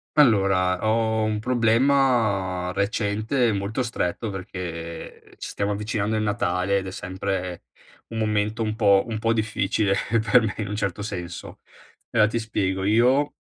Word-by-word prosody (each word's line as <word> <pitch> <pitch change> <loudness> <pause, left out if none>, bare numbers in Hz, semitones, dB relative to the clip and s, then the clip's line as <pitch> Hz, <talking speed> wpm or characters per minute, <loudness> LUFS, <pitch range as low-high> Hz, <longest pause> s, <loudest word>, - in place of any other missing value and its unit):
Allora, 95 -9 +3
ho 110 0 +1
un 110 0 0
problema 115 -6 +2
recente 110 +5 0
e - - +2
molto 100 +5 -2
stretto, 110 -2 -2
perché 85 -3 -7
ci - - -6
stiamo 100 +1 -1
avvicinando 105 +1 -2
al 110 - 0
Natale, 100 -2 0
ed 95 - -6
è - - -5
sempre 95 -1 -4 0.4
un 115 - -7
momento 105 +1 0
un 110 -1 -2
po' 100 -3 +4
un 110 -2 -3
po' 115 +1 +1
difficile 105 -2 0 0.4
per 125 - +7
me, 110 -3 -2
in 105 -2 -3
un 105 - -3
certo 100 -1 -2
senso. 90 -4 -6 0.5
Ela 110 -2 +4
ti 115 +2 -1
spiego: 95 -4 -2
io 125 +8 +3
105 Hz, 150 wpm, -24 LUFS, 95-115 Hz, 0.5 s, per